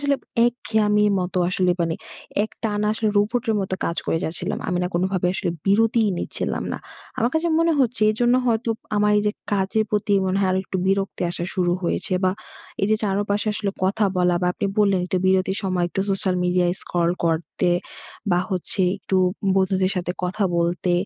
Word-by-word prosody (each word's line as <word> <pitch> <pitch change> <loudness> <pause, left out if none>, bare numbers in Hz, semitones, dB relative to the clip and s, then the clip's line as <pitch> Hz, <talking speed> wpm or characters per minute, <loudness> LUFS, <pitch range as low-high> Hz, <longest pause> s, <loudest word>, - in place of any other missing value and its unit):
আসলে 285 -1 +1 0.3
একঘেয়েমির 210 -3 +2
মতো 180 0 -2
আসলে 180 0 +1
মানে 165 -1 0 0.5
এক 215 - -3
টানা 210 -1 0
আসলে 220 0 0
রোবটের 225 +2 +1
মতো 190 -1 -2
কাজ 170 - -2
করে 165 - +1
যাচ্ছিলাম। 165 +2 -3
আমি 180 - 0
না - - +1
কোনোভাবে 185 0 0
আসলে 190 -2 -1
বিরতিই 220 +2 +3
নিচ্ছিলাম - - -3
না। - - -3 0.4
আমার 235 - +2
কাছে 335 +1 +1
মনে 330 0 +3
হচ্ছে 255 - +5 0.2
এই - - -2
জন্য 240 +1 +4
হয়তো 230 0 +1 0.3
আমার 210 0 +3
এই - - 0
যে 210 - +2 0.2
কাজের 205 +2 +1
প্রতি 210 0 0
মনে 185 +1 0
হয় 190 - +2
আরো 185 - +1
একটু 190 - -4
বিরক্তি 195 -1 0
আসা 175 -1 -4
শুরু 175 -2 +1
হয়েছে। 185 +3 -1
বা 185 - +4 0.5
এই - - +4
যে 215 - +4
চারপাশে 205 +1 0
আসলে 205 -2 -1
কথা 205 +3 +2
বলা 180 -1 +3
বা - - +2
আপনি 200 - -2
বললেন, 200 -3 +4
একটু 185 - 0
বিরতির 190 +1 +2
সময় 185 -2 0
একটু 195 - -3
সোশ্যাল 190 -1 +1
মিডিয়া 180 0 +2 0.2
scroll 170 -1 0
করতে 165 +2 0 0.6
বা 175 - +3
হচ্ছে 185 +1 -2 0.2
একটু 190 - -1 0.4
বন্ধুদের 190 0 +2
সাথে 180 0 -1
কথা 190 +3 -1
বলতে 175 +1 0
195 Hz, 185 wpm, -23 LUFS, 180-210 Hz, 0.6 s, হচ্ছে